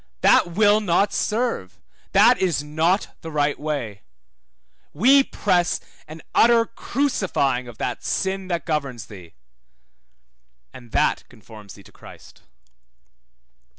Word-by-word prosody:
That 175 - +4
will 205 +2 +4
not 200 +1 +1
serve 220 - -2 0.3
that - - +5
is 175 -6 0
not 160 +6 -1
the 165 - -7
right 145 -2 -1
way; 140 -9 -4 0.9
we 265 - +5
press 180 -8 0 0.3
an 155 +1 -11
utter 230 0 +4
crucifying 190 - -1
of 120 -2 -11
that - - -4
sin 190 0 -2
that 170 -2 -3
governs 140 - -3
thee: 90 -5 -14 1.4
and 120 -3 -14
that - - 0
conforms 105 -2 -14
thee 100 - -16
to - - -18
Christ. - - -16
160 Hz, 120 wpm, -22 LUFS, 125-205 Hz, 1.4 s, that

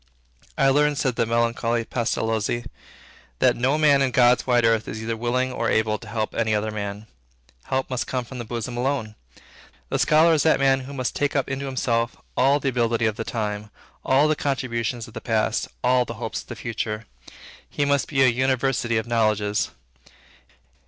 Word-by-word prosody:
"I 135 - +4
learned," 145 +1 +3
said 130 -4 0
the 115 - 0
melancholy 115 0 0
Pestalozzi, 115 -1 -1 0.7
"that - - +3
no 130 +5 +1
man 145 -3 +4
in 135 - +2
God's 125 -1 +3
wide 120 -2 +3
earth 115 -1 +2
is 110 - -5
either 115 +1 -3
willing 125 +3 -1
or 115 - -1
able 110 -1 +1
to 115 - -12
help 110 0 -3
any 110 -2 +1
other 105 +1 -1
man." 100 0 -5 0.6
Help 130 0 -1
must 125 -2 -3
come 125 -2 -2
from 130 +1 -9
the - - -3
bosom 120 +1 -5
alone. 125 -3 -1 0.8
The - - -1
scholar 160 +2 +5
is 155 - +3
that 160 +2 +3
man 135 -1 +3
who 135 +2 -8
must 130 -2 -2
take 145 0 0
up 140 - +1
into 135 +1 -3
himself 120 -3 -1 0.2
all 140 +3 +3
the 140 - 0
ability 115 -2 +1
of 110 -2 +1
the 115 - -4
time, 105 -2 -3 0.3
all 140 +3 +4
the 155 - +2
contributions 120 -5 -2
of 115 - -14
the - - -7
past, 110 -1 0 0.2
all 125 0 +4
the - - -7
hopes - - -4
of - - -19
the - - -7
future. 110 -1 -4 0.6
He 145 - -1
must 140 -1 +1
be 135 -3 +2
an 130 -2 +4
university 130 -2 +1
of 110 - -1
knowledges. 110 -3 +1
120 Hz, 190 wpm, -24 LUFS, 110-135 Hz, 0.8 s, scholar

